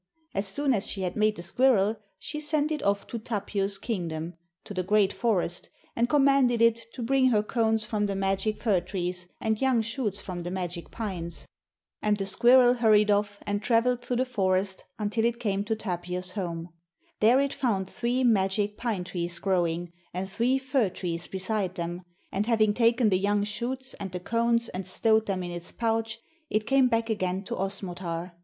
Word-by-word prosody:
As 195 +1 -1
soon 280 +6 +1
as 205 -4 -1
she 195 - -2
had 180 -1 -2
made 215 0 +2
the 170 - -5
squirrel, 215 +1 +3 0.2
she 300 +9 -4
sent 305 0 +1
it 300 -2 -1
off 200 0 +1
to 235 - -5
Tapio's 200 -2 -1
kingdom, 170 -6 -3 0.3
to - - -8
the 185 - -1
great 200 +1 +3
forest, 180 -7 -1 0.3
and 235 +1 +1
commanded 275 -4 +4
it 230 0 +3
to 245 - -5
bring 260 +2 +3
her 210 -4 +3
cones 220 -1 +1
from 210 -1 0
the 200 - -2
magic 195 +2 0
fir 200 -6 +2
trees 180 -1 -3
and 220 +1 -1
young 260 -4 +3
shoots 225 -3 -2
from 180 -3 -5
the 175 - -4
magic 180 -2 -4
pines. 180 -7 -4 0.5
And 210 -1 +2
the 195 - -2
squirrel 245 +5 +5
hurried 215 -3 +4
off 205 0 0
and 205 0 -1
travelled 245 +2 +2
through 245 0 -2
the 255 +2 +1
forest 190 -5 0
until 215 +1 -1
it 235 0 +1
came 200 -4 0
to 220 +1 0
Tapio's 180 -2 -3
home. 175 -4 -4 0.5
There 235 +5 +5
it 280 0 +1
found 200 -8 0
three 245 +5 -1
magic 205 -2 +2
pine 220 -7 -2
trees 175 -1 -3
growing, 175 -2 0 0.2
and 185 +1 -2
three 235 +7 +1
fir 260 -5 +1
trees 175 -2 -4
beside 190 -1 -2
them, 175 0 -4 0.3
and 200 +3 -1
having 215 -3 +3
taken 235 0 +3
the 185 -2 +2
young 205 +1 +1
shoots 255 +5 -4
and 195 -2 -5
the 180 - -4
cones 230 +4 +1
and 185 0 -5
stowed 220 +3 +3
them 190 -2 -1
in 175 - -5
its 175 0 -5
pouch, 225 -1 -1 0.3
it 215 0 0
came 265 +2 +4
back 230 -1 0
again 185 -2 -1
to - - -4
Osmotar. 180 -3 -4
210 Hz, 190 wpm, -27 LUFS, 185-235 Hz, 0.5 s, squirrel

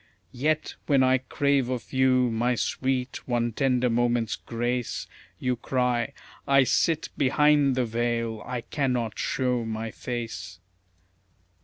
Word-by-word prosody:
Yet, 155 +5 0
when 140 -3 +4
I 130 0 +4
crave 140 0 +1
of 125 0 -4
you, 130 -2 +3
my 120 +2 +1
sweet, 130 +1 -2
one 120 -1 0
tender 125 +1 +1
moment's 120 -1 +1
grace, 120 +1 -3 0.3
You 125 +3 0
cry, 125 +1 0 0.3
"I 140 -1 +6
SIT 160 +4 +1
BEHIND 145 0 +4
THE 130 -1 +1
VEIL, 115 -1 -1
I 125 -1 -4
CANNOT 125 -4 -2
SHOW 125 -2 0
MY 110 0 -4
FACE." 110 -8 -5
125 Hz, 125 wpm, -26 LUFS, 120-130 Hz, 0.3 s, I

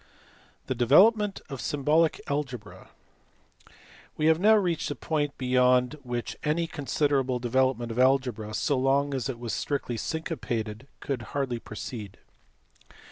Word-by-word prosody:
The - - -1
development 195 - +4
of 135 -3 -6
symbolic 150 +3 +2
algebra. 130 -7 -5 1.3
We 155 - 0
have 160 0 +4
now 215 +4 +6
reached 175 -7 0
a 145 - -3
point 145 0 -2
beyond 125 0 +3
which 120 -2 -4
any 155 +3 +1
con 150 -3 -7
siderable 135 -4 +1
development 120 -1 +1
of 115 - -4
algebra, 125 -5 +1
so 140 -3 +1
long 140 +2 +2
as 135 -1 -2
it 125 - -4
was 115 -3 -5
strictly 135 -5 -2
syncopated, 120 -6 -4
could 135 -4 -3
hardly 130 -2 -3
proceed. 105 -2 -8
135 Hz, 135 wpm, -27 LUFS, 120-150 Hz, 1.3 s, now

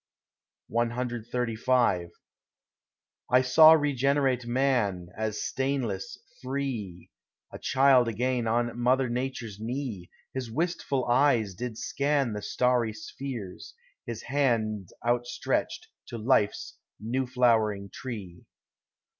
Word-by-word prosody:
CXXXV 120 -4 0 1.2
I 125 +1 +5
saw 155 +5 +8
regenerate 140 -4 +1
Man, 120 -9 0
as 110 0 -2
stainless, 125 -8 -2 0.2
free— 125 -10 -4 0.4
A - - -7
child 130 -2 +4
again 120 +1 -1
on 120 +1 0
mother 130 +2 +3
Nature's 120 -4 -4
knee; 115 - -4 0.2
His 130 -3 -4
wistful 140 -1 -1
eyes 120 -5 +3
did 115 +4 -5
scan 140 -3 0
the 105 - -4
starry 125 -1 +1
spheres, 110 -2 -7 0.3
His 115 -2 -6
hand 115 -8 0 0.2
outstretched 120 0 -1 0.2
to 120 - -6
life's 110 -2 0 0.2
new 125 +4 -2
flowering 110 -5 +2
tree. 100 -9 -7
120 Hz, 95 wpm, -28 LUFS, 110-130 Hz, 1.2 s, saw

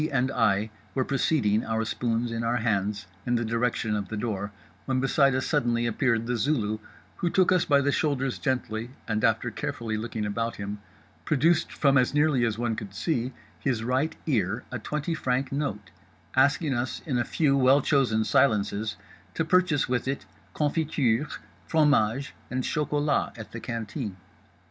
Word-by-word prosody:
and 130 -1 +1
I 110 -3 +2 0.2
were 130 -1 +1
proceeding 125 -6 +2
(our 110 0 -1
spoons 115 +1 -1
in 115 0 -2
our 115 +1 +1
hands) 105 -3 0 0.2
in 120 +2 0
the 120 0 0
direction 115 -1 0
of 100 -2 -2
the 110 - -4
door, 105 -2 -3 0.3
when 130 -1 0
beside 135 0 +3
us 130 - 0
suddenly 120 -6 +1
appeared 115 0 +1
The 120 0 -1
Zulu—who 110 +5 -2
took 185 +1 +3
us 185 -1 +3
by 140 -2 +4
the 145 +1 +2
shoulders 135 -4 0
gently 120 -4 -2 0.2
and 110 -1 -1
(after 115 +2 +2
carefully 115 -4 -3
looking 110 -1 -3
about 115 +3 -2
him) 100 +1 -5 0.4
produced 155 - +2
from, 140 -2 +3
as 125 +3 +1
nearly 145 -4 +3
as 110 -2 -1
one 120 -1 -1
could 100 -3 -7
see, 125 - -1 0.3
his 120 -5 -1
right 130 +6 0
ear 115 - 0
a 130 - -3
twenty 150 +8 -2
franc 130 -4 -1
note; 105 - -3 0.4
asking 140 +2 +3
us 120 0 -2
in 130 -5 0
a - - +2
few 140 +2 +2
well 135 +1 +5
chosen 120 -6 +2
silences 110 -3 +2 0.4
to 165 - 0
purchase 180 -4 +3
with 125 0 -1
it 135 +1 -2 0.3
confiture, 150 -4 +1 0.4
fromage, 140 -5 +2 0.2
and 130 0 -2
chocolat 150 -2 0
at 110 - -9
the 115 - -6
canteen. 115 -3 -4
125 Hz, 165 wpm, -27 LUFS, 110-140 Hz, 0.4 s, well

